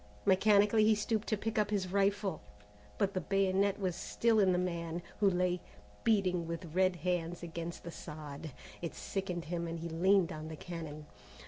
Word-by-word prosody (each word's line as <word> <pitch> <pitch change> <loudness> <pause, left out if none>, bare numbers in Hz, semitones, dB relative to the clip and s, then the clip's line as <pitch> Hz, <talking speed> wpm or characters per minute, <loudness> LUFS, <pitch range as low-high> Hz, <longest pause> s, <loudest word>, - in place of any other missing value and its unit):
Mechanically 205 +2 +5
he 215 0 +5
stooped 215 +1 -1
to 215 - +1
pick 220 +1 -1
up 210 -1 +2
his 195 -3 -1
rifle, 200 0 +1 0.6
but 200 0 +1
the 185 - -1
bayonet 195 +2 +2
was 185 -3 -1
still 225 +4 +2
in 190 -2 +5
the 180 - +2
man, 170 -1 -2 0.2
who 205 -2 +5
lay, 180 -1 +1 0.4
beating 185 -6 +2
with 165 -1 -5
red 185 0 +3
hands 175 0 -2
against 170 0 -5
the 170 - -6
sod. 150 -1 -7 0.3
It 170 - -4
sickened 180 -3 -3
him 170 +1 -2
and 165 0 -4
he 170 +1 -4
leaned 185 +2 +3
on 155 0 -6
the 160 - -6
cannon. 155 -2 -7
180 Hz, 180 wpm, -33 LUFS, 170-200 Hz, 0.6 s, Mechanically